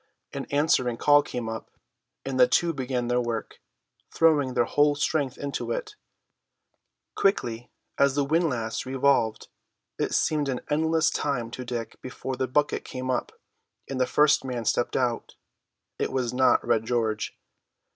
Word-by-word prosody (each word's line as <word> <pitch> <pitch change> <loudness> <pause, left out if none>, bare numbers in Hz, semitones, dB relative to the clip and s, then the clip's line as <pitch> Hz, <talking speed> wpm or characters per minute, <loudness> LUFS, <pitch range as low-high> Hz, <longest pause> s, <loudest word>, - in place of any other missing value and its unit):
An 140 -1 -4
answering 140 -5 +2
call 145 +2 +5
came 125 -5 -5
up, 110 0 -6 0.6
and 135 -1 -2
the 125 - +7
two 170 -1 +2
began 125 -3 -2
their 125 0 +1
work, 120 -2 -4 0.5
throwing 145 -6 +2
their 120 -1 +3
whole 145 +3 +3
strength 145 -2 -1
into 140 -1 -4
it. - - -3 1.2
Quickly 120 - 0 0.3
as 140 -1 +4
the 145 -1 +1
windlass 140 -8 0
revolved, 130 -4 +1 0.5
it - - 0
seemed 150 -3 +1
an 125 -2 -2
endless 160 +1 +2
time 125 -5 -2
to 125 - -6
Dick 120 -2 -5
before 130 +1 -5
the 130 +1 -1
bucket 145 +4 0
came 130 0 -4
up, 125 - -2 0.6
and 130 -1 -3
the 125 - +2
first 150 0 +4
man 125 -3 -4
stepped 120 - +1
out. 120 -3 -1 0.6
It - - -1
was 125 -2 -1
not 130 +1 +3
Red 115 -2 +2
George. 115 -3 -1
130 Hz, 150 wpm, -26 LUFS, 120-145 Hz, 1.2 s, the